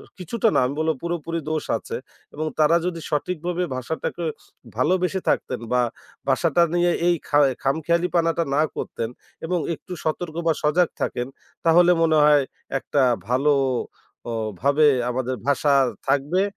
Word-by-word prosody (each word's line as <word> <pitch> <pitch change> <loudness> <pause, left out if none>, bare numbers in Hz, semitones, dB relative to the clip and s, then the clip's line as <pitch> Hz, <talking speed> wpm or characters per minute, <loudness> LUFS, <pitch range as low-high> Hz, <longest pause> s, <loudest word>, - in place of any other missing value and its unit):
আ - - -13 0.2
কিছুটা 220 +5 0
না, - - +4
আমি 140 - -3
বলবো 160 0 +1
পুরোপুরি 170 -1 -3
দোষ 155 -1 -1
আছে - - -6 0.4
এবং 155 +1 -3
তারা 155 +2 +5
যদি 170 -2 -3
সঠিকভাবে 175 +3 -2
ভাষাটাকে 160 +6 -4 0.5
ভালোবেসে 185 +2 +1
থাকতেন - - 0
বা 125 0 +3 0.5
বাসাটা 165 +5 +3
নিয়ে 175 0 +3
এই 175 - +4
খা 145 - +3 0.2
খামখেয়ালিপানাটা 170 +3 +1
না 150 - +4
করতেন 115 - -3 0.4
এবং 180 +1 0 0.2
একটু 180 - -12
সতর্ক 160 +1 -2
বা, 165 - +5
সজাগ 165 +4 +3
থাকেন, 120 - -1 0.4
তাহলে 175 +2 +6
মনে 160 -1 +3
হয় 150 -1 +6 0.4
একটা 140 +1 0 0.3
ভালো 135 +4 +3 0.8
অ - - -3 0.3
ভাবে 145 +3 +4 0.2
আমাদের 130 +1 -2
ভাষা 145 0 +3 0.4
থাকবে 150 +7 +2
160 Hz, 140 wpm, -23 LUFS, 145-175 Hz, 0.8 s, তাহলে